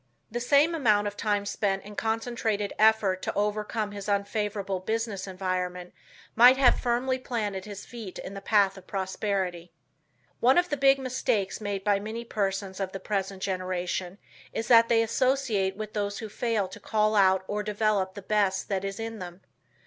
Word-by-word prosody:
The 240 - -2
same 285 +7 +4
amount 215 -10 +3
of 205 0 -3
time 205 -1 0
spent 195 -1 -1
in 210 0 -10
concentrated 225 -2 -1
effort 215 -4 +4
to - - -3
overcome 210 +1 -1
his 205 0 -6
unfavorable 200 -1 -1
business 220 0 -3
environment 180 -1 -3 0.4
might 245 +3 +8
have 265 -2 +5
firmly 255 +2 0
planted 210 -6 -3
his 205 -1 -8
feet 225 -6 -8
in 190 - -7
the 195 - -7
path 200 -2 +2
of 185 - -20
prosperity. 190 -2 -2 0.7
One 255 +5 +4
of 355 0 +3
the 290 - 0
big 275 -1 +5
mistakes 235 -7 -1
made 200 -2 -3
by 205 -1 +2
many 220 +3 -6
persons 195 -3 -2
of 190 -1 -3
the 195 - -4
present 195 -1 -3
generation 185 0 -2 0.3
is 225 - -4
that 230 -1 +7
they 230 -1 +4
associate 230 -5 +1
with 215 -1 -6
those 205 -1 -2
who 220 - -6
fail 220 -2 -1
to 205 - -10
call 215 0 +1
out 190 -2 +4
or 210 0 -2
develop 210 -2 0
the 200 - -8
best 200 -2 +1
that 195 -1 -1
is 195 +1 -4
in 225 -1 -5
them. 180 0 -8
205 Hz, 175 wpm, -27 LUFS, 195-225 Hz, 0.7 s, might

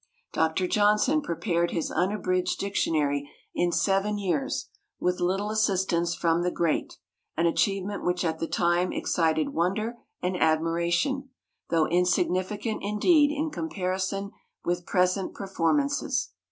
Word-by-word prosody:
Dr. 160 +3 +1
Johnson 210 +10 +3
prepared 170 - 0
his 165 - -2
unabridged 185 -1 0
dictionary 145 -7 0 0.2
in 175 0 +1
seven 195 +3 +1
years 175 -8 -1 0.3
"with 180 0 0
little 195 +4 0
assistance 185 -5 +1
from 165 0 +1
the 180 - +1
great," 170 -3 -1 0.4
an 165 - +2
achievement 195 +3 0
which 180 0 0
at 160 -1 -1
the 165 - -2
time 175 +1 +1
excited 160 -2 +1
wonder 215 +8 -1 0.2
and 180 +1 -1
admiration, 170 - +1 0.4
though 165 -2 +3
insignificant 185 +5 0
indeed 290 - +4
in 300 +1 -2
comparison 195 - -2 0.3
with 175 0 -1
present 185 +1 +1
performances. 205 - 0
180 Hz, 120 wpm, -27 LUFS, 170-205 Hz, 0.4 s, indeed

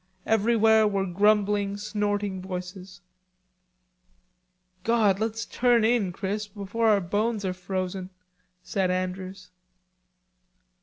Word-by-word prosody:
Everywhere 220 0 +4
were 195 -2 0
grumbling 205 +1 +2
snorting 205 -2 -2
voices. 180 0 -7 1.8
"God, 215 -4 +2
let's 225 +1 -2
turn 240 -2 +2
in, 225 -5 +2
Chris, 200 +3 -3
before 205 +3 -2
our 210 -2 +5
bones 205 +3 -1
are 185 - -1
frozen," 185 0 -4 0.5
said 190 -1 -1
Andrews. 185 +1 -4
200 Hz, 95 wpm, -26 LUFS, 185-215 Hz, 1.8 s, our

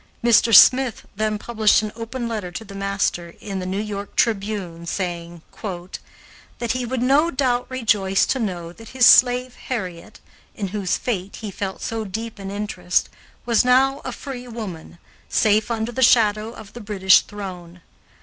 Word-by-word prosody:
Mr. 235 -1 +4
Smith 250 +3 +6
then 215 -1 -1
published 215 -1 +2
an 215 - -4
open 235 +2 -5
letter 215 -6 -4
to 220 +6 -7
the 200 - -11
master 195 -3 -2
in 195 -2 -5
the 185 - -5
New 190 +2 -2
York 205 -1 -5
Tribune, 195 -6 -1
saying 170 -2 -4 1.1
"that 235 -2 -2
he 255 0 -2
would 250 0 -2
no 285 +6 +3
doubt 255 -4 0
rejoice 210 -7 +1
to 265 - -1
know 175 -6 -4
that 225 +4 -13
his 250 - +6
slave 250 +1 +6
Harriet, 190 -4 -5 0.4
in 200 -3 -4
whose 195 -2 -1
fate 200 -5 -3
he 215 -2 -7
felt 190 0 -5
so 225 -1 -3
deep 220 +2 -6
an 195 -1 -6
interest, 200 -3 -1 0.4
was 235 -2 +3
now 265 +2 +3
a - - -4
free 250 -3 -8
woman, 205 -9 -8 0.3
safe 215 +1 +2
under 225 0 -2
the 260 - -4
shadow 220 -3 +4
of 220 -3 -12
the 240 - -9
British 195 -3 +4
throne. 180 -4 -9
215 Hz, 165 wpm, -22 LUFS, 190-235 Hz, 1.1 s, Smith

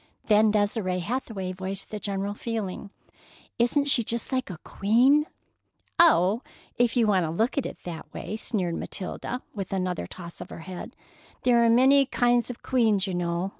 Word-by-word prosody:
Then 215 0 +5
Desire 205 -3 0
Hathaway 195 -1 -3
voiced 190 +1 -6
the 210 - -4
general 200 0 -2
feeling: 210 -3 -4 0.7
"Isn't 255 +5 +3
she 265 -4 +4
just 235 +4 -3
like 255 -3 -1
a 180 - -6
queen?" 255 +9 +3 0.7
"Oh, 225 - +5 0.3
if 240 0 +1
you 235 - +4
want 195 -4 +3
to - - -3
look 220 - 0
at 280 - 0
it - - -9
that 165 -3 -8
way!" 215 - -5
sneered 190 -6 -2
Matilda, 240 +6 -5
with 195 -3 -5
another 185 -2 -2
toss 170 -2 -9
of - - -8
her - - -9
head. 185 +1 -8 0.5
"There 240 -2 +4
are - - +4
a - - +4
good 230 - +5
many 275 +3 +6
kinds 245 -2 +2
of 245 - -8
queens, 220 -6 +2
you 190 - -3
know. 175 +1 -1
210 Hz, 180 wpm, -26 LUFS, 185-240 Hz, 0.7 s, many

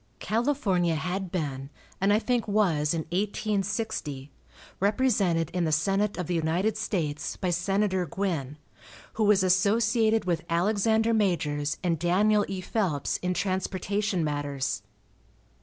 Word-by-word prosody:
California 210 - +1
had 180 +3 -3
been, 140 -6 -3 0.3
and 195 +1 +3
I 205 - +5
think 240 0 0
was, 175 -8 +2
in 165 - -1
1860, 195 -7 -2 0.5
represented 200 - +1
in 180 -1 -1
the 160 - 0
senate 195 +6 +1
of 180 - -2
the 180 - -2
United 170 +6 0
States 155 -8 -2
by 180 -2 -1
Senator 190 +1 0
Guin, 155 -6 -3 0.6
who 220 - 0
was 205 -2 +4
associated 220 +4 +3
with 170 -3 0
Alexander 220 +6 +2
Majors 155 -8 0
and 170 -3 0
Daniel 205 +5 +3
E. 190 -1 -4
Phelps 180 -8 -1
in 180 0 -2
transportation 190 0 -1
matters. 145 -2 -2
185 Hz, 125 wpm, -27 LUFS, 165-210 Hz, 0.6 s, I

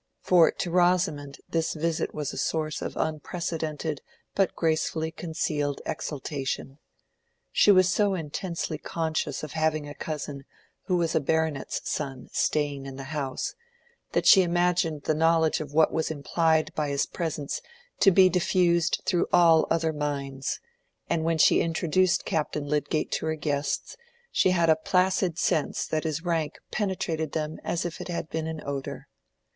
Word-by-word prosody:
For 175 -3 +6
to 175 - -3
Rosamond 175 -5 +2
this 165 0 -1
visit 160 +1 -1
was 150 -2 -4
a - - -7
source 155 -1 -1
of - - -5
unprecedented 160 -1 -3 0.3
but 195 -2 +1
gracefully 160 0 0
concealed 155 -4 -2
exultation. 140 -1 -4 0.7
She - - +4
was 185 -2 +7
so 195 +2 +2
intensely 165 0 -4
conscious 160 -2 -2
of 155 - -5
having 155 -1 0
a 145 - -7
cousin 145 -2 -5 0.4
who 180 - +2
was 170 -2 0
a - - +3
baronet's 160 -1 -1
son 135 -4 -4
staying 145 -2 0
in 135 - -7
the 135 - -7
house, 135 -4 -3 0.6
that - - +1
she 195 - +8
imagined 175 -3 +1
the 155 - +1
knowledge 160 0 +3
of 150 - -6
what 155 +1 +4
was 160 - 0
implied 160 +1 +1
by 150 -2 -1
his 140 0 +1
presence 155 -4 -3 0.4
to - - +7
be 190 0 +6
diffused 175 -1 +2
through 175 -2 +1
all 165 -2 +5
other 165 -1 +1
minds; 140 -2 -3 0.5
and 160 - +1
when 165 0 +1
she - - +5
introduced 170 +2 +1
Captain 150 -2 -1
Lydgate 150 +1 -1
to - - -1
her 160 - 0
guests, 145 - -2 0.4
she - - +3
had 170 -2 +3
a 160 - +6
placid 185 0 +1
sense 155 - 0
that 155 +1 -2
his 160 +2 -2
rank 165 -3 -1
penetrated 170 -6 -2
them 155 0 -3
as 170 0 -1
if 175 - -5
it - - -6
had 170 -2 -4
been 160 0 -2
an 160 -1 -5
odor. 140 -1 -5
160 Hz, 155 wpm, -27 LUFS, 150-170 Hz, 0.7 s, she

